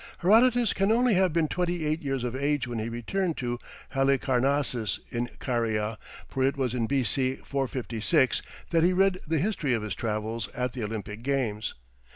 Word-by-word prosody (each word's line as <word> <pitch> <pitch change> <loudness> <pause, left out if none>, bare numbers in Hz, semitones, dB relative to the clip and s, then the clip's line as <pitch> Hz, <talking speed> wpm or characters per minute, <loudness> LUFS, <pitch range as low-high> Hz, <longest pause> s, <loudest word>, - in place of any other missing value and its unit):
Herodotus 235 +5 +5
can 195 +2 +2
only 240 +1 +4
have 185 -2 +3
been 160 -1 +2
twenty 175 -1 -1
eight 155 +2 0
years 135 -3 -2
of 125 0 -2
age 140 0 0
when 120 -2 -3
he 110 +1 -2
returned 165 +10 -2
to 120 -1 -2 0.3
Halicarnassus 135 -3 +1
in 120 +1 -2
Caria, 110 -3 -1 0.3
for 135 - -3
it 135 +2 +2
was 130 -3 0
in 120 -3 0
B.C. 130 0 +1
456 130 +1 +1 0.3
that 165 -1 +4
he 180 +2 +4
read 190 0 +3
the 160 +1 +1
history 155 - +1
of 110 - -3
his 105 -2 -3
travels 110 +1 -2
at 125 -1 -1
the 125 - -4
Olympic 105 0 -5
Games. 120 -5 -1
135 Hz, 175 wpm, -28 LUFS, 115-165 Hz, 0.3 s, Herodotus